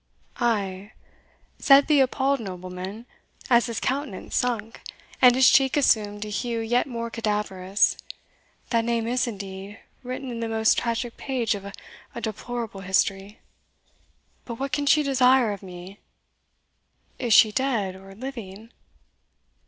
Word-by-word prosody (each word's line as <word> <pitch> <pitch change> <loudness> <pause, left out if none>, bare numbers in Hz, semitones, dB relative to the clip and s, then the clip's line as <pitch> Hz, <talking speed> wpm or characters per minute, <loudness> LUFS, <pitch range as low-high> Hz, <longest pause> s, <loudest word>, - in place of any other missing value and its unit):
"Ay," 205 -4 -1 0.7
said 275 0 +6
the 300 -2 +3
appalled 270 +1 +2
nobleman, 185 +2 -7 0.5
as 235 0 +5
his 230 -2 -3
countenance 270 -6 -3
sunk, 230 -2 -2 0.4
and 250 -1 +7
his 260 0 +6
cheek 270 +2 +4
assumed 210 -6 +2
a - - -7
hue 230 +2 -2
yet 240 +3 +1
more 235 -2 -5
cadaverous; 205 -4 0 0.7
"that 230 -2 +2
name 230 -1 -1
is 245 +2 0
indeed 200 -1 -7 0.2
written 255 +1 -6
in 235 - -5
the 230 -1 -3
most 220 0 +2
tragic 235 0 -3
page 250 -5 -1
of 200 -1 -7
a 200 - -8 0.4
deplorable 230 -2 -5
history. 195 +1 -1 1.0
But 235 - -7
what 275 +3 -4
can 285 +2 -1
she 300 +1 +5
desire 260 -4 +4
of 200 - -9
me? 185 +1 -11 1.2
Is 240 -2 -2
she 215 0 +7
dead 220 -7 -1
or 195 +1 -13
living?" 225 -3 -8
230 Hz, 135 wpm, -25 LUFS, 200-255 Hz, 1.2 s, and